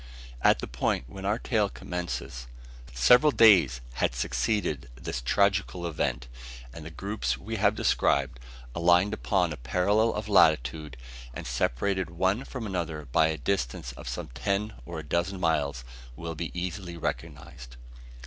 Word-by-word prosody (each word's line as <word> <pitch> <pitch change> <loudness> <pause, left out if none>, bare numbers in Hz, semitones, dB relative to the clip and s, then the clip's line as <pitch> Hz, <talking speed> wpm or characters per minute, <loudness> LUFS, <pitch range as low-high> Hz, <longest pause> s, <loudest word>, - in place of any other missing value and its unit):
At - - +5
the - - -5
period 60 +1 -1
when 95 +10 -9
our 105 +2 +1
tale 110 -4 0
commences, 70 -11 -5 0.4
several 125 - +5
days 85 - +6 0.2
had - - +1
succeeded 60 - -1
this 60 - -4
tragical 95 +4 +1
event; 70 -7 -2 0.5
and 80 - -9
the 80 - -7
groups 80 - -3
we 65 - -5
have - - +3
described, 65 -3 +1 0.3
aligned 90 +5 +3
upon 90 -6 0
a - - -8
parallel 100 - +2
of 105 0 -4
latitude, 75 - +3 0.4
and - - -6
separated 80 +10 -1
one 95 +9 0
from 125 -4 -6
another 85 -6 -3
by 80 +5 +4
a 80 0 -2
distance 75 -5 -2
of - - -8
some 85 -4 -5
ten 100 - -2
or 85 -1 -6
a 80 - -5
dozen 85 +4 -1
miles, 70 -7 0 0.3
will 85 +5 -5
be 80 +1 -4
easily 90 -1 -5
recognised. 70 -7 -6
85 Hz, 150 wpm, -28 LUFS, 65-100 Hz, 0.5 s, days